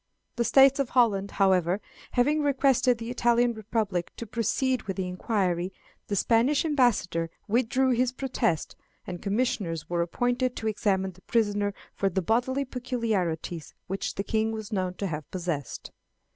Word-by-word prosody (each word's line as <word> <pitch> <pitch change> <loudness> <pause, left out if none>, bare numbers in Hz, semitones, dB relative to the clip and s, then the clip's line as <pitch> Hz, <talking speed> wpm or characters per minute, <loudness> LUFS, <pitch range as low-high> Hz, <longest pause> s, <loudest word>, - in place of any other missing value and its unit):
The 240 - +1
States 270 +3 +6
of 275 -3 0
Holland, 205 -6 +3
however, 190 -1 +2 0.3
having 295 +5 +3
requested 270 -3 +3
the 230 +1 -5
Italian 240 0 +3
Republic 215 -5 -2
to 230 - -5
proceed 235 +4 0
with 195 - -3
the 190 -1 -1
inquiry, 180 -1 -1 0.4
the 205 - -1
Spanish 235 - +3
ambassador 235 - +2 0.2
withdrew 255 +4 +2
his 250 0 +2
protest, 250 - -1 0.3
and 180 -2 -6
commissioners 200 -7 -1
were 170 -1 +1
appointed 245 +8 0
to 220 - -3
examine 190 -3 0
the 185 +1 -21
prisoner 205 -3 0 0.2
for 195 - 0
the 190 0 -1
bodily 255 +7 +1
peculiarities 220 - -2
which 195 +2 -3
the 200 - -2
king 220 +1 0
was 220 -1 -6
known 185 -2 -1
to 200 - -3
have 155 -5 -4
possessed. 170 -7 -4
220 Hz, 150 wpm, -27 LUFS, 185-245 Hz, 0.4 s, States